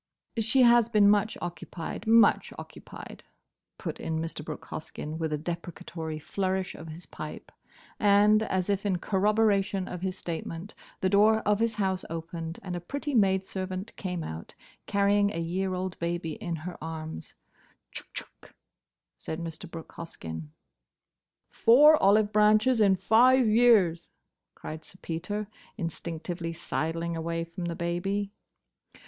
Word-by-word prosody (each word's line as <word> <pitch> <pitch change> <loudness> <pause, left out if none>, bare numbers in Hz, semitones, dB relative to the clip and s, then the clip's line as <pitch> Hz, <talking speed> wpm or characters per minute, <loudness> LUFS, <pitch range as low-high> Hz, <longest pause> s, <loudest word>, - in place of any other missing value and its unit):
"She 225 +4 +4
has 235 -1 +6
been 210 -3 +5
much 210 +1 +3
occupied—much 175 +6 +1
occupied," - - -10 0.5
put - - -5
in 160 -1 -2
Mr. 160 -1 -4
Brooke 155 0 -7
Hoskyn, 155 0 -6
with 160 -1 -1
a 150 - 0
deprecatory 165 0 -5
flourish 190 +3 -2
of 165 - -10
his 160 +2 -9
pipe. - - -8 0.5
And, 210 +1 +5
as 190 -4 -1
if 200 -1 0
in 195 -3 +1
corroboration 200 0 +1
of 180 -1 -6
his 190 0 -2
statement, 170 +3 -5 0.3
the 185 - +2
door 215 +2 +5
of 210 -1 +1
his 225 -1 +1
house 190 -3 0
opened 165 0 -5
and 180 -2 -4
a - - -2
pretty 285 - -4
maidservant 190 -2 0
came 180 -4 -4
out, 80 - -7 0.3
carrying 200 0 +3
a - - -2
year 185 +3 -1
old 185 0 -4
baby 170 -1 -2
in 175 -3 -4
her 180 -3 -7
arms. 160 - -6 0.6
"Chck! - - -9
chck!" - - -10 0.6
said 160 - -5
Mr. 165 -1 -7
Brooke 165 -1 -9
Hoskyn. 80 - -7 1.0
"Four 295 +7 +6
olive 205 +2 +4
branches 215 +3 +4
in 195 -2 +5
five 245 +7 +5
years!" 215 -7 +4 0.5
cried 155 0 -7
Sir 185 - -9
Peter, 190 +6 -4 0.3
instinctively 170 -1 -4
sidling 165 +1 -2
away 165 +1 -2
from 170 +2 -6
the 170 -1 -3
baby. 195 +4 -2
185 Hz, 140 wpm, -28 LUFS, 165-210 Hz, 1.0 s, has